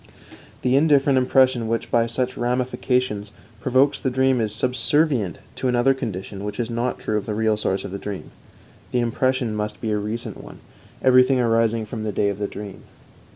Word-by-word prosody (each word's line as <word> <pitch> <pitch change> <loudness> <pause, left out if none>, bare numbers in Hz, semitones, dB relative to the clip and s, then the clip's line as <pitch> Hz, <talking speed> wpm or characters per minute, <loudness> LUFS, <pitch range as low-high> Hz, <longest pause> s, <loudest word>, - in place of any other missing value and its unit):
The 125 +1 +3
indifferent 140 -2 +4
impression 130 -2 +3
which, 115 0 -2
by 115 -1 +3
such 125 +2 -2
ramifications, 125 -3 -1 0.3
provokes 130 +5 +2
the 130 - 0
dream 130 -1 +2
is 110 -2 -1
subservient 125 - +1 0.2
to - - -1
another 125 +2 +3
condition 100 -5 -5
which 105 +1 -5
is 120 -1 -2
not 120 +2 -1
true 110 - -2
of - - -10
the 105 - -2
real 110 0 +2
source 95 -2 -1
of - - -6
the 100 - -5
dream 100 -1 -6 0.6
the 125 - +1
impression 120 0 0
must 105 0 -3
be 110 - -2
a 105 - +1
recent 110 +3 -5
one, - - -11 0.5
everything 130 0 +5
arising 115 -1 +2
from 110 0 -6
the 110 - -2
day 100 +1 +1
of 100 0 -4
the 100 - -1
dream. 100 -1 -8
115 Hz, 185 wpm, -23 LUFS, 105-130 Hz, 0.6 s, everything